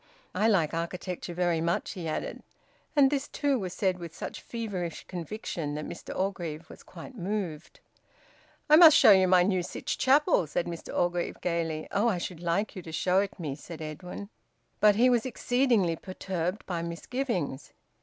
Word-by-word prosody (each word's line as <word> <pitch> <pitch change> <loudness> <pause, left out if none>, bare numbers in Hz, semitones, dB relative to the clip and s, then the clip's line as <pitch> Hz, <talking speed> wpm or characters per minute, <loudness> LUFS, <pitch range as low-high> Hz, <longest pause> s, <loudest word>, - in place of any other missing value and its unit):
"I 220 - +2
like 175 -9 +2
architecture 175 +1 -4
very 175 -2 +1
much," 170 +1 -1
he 175 -3 -6
added. 155 - -4 0.5
And 280 -2 +5
this 285 -1 -1
too 285 -3 0
was 185 -3 -4
said 185 -1 0
with 170 -2 -8
such - - -6
feverish 195 -8 -5
conviction 170 -4 -4
that 150 - -4
Mr - - -7
Orgreave 170 -5 -3
was - - -13
quite 185 +9 -11
moved. 180 -6 -4 0.9
"I 305 - +8
must 325 -3 +9
show - - +8
you 190 -1 +6
my 180 -1 +5
new 185 -1 +1
Sytch 175 - -4
Chapel," 270 - +4
said 170 - -1
Mr 170 -1 -7
Orgreave 175 0 0
gaily. 165 -3 -2
"Oh! 205 +3 +2
I 210 -6 +1
should 175 -1 -5
like 175 +6 -1
you 185 - -6
to 165 - -9
show 180 +4 +2
it 200 -1 -3
me," 150 -5 -3
said 165 +4 -10
Edwin. 180 +6 -7 0.5
But 210 -1 +6
he 240 +4 +5
was 240 -3 +3
exceedingly 245 -7 +1
perturbed 185 +1 -4
by 175 -3 -3
misgivings. 170 - -3
180 Hz, 175 wpm, -28 LUFS, 170-215 Hz, 0.9 s, must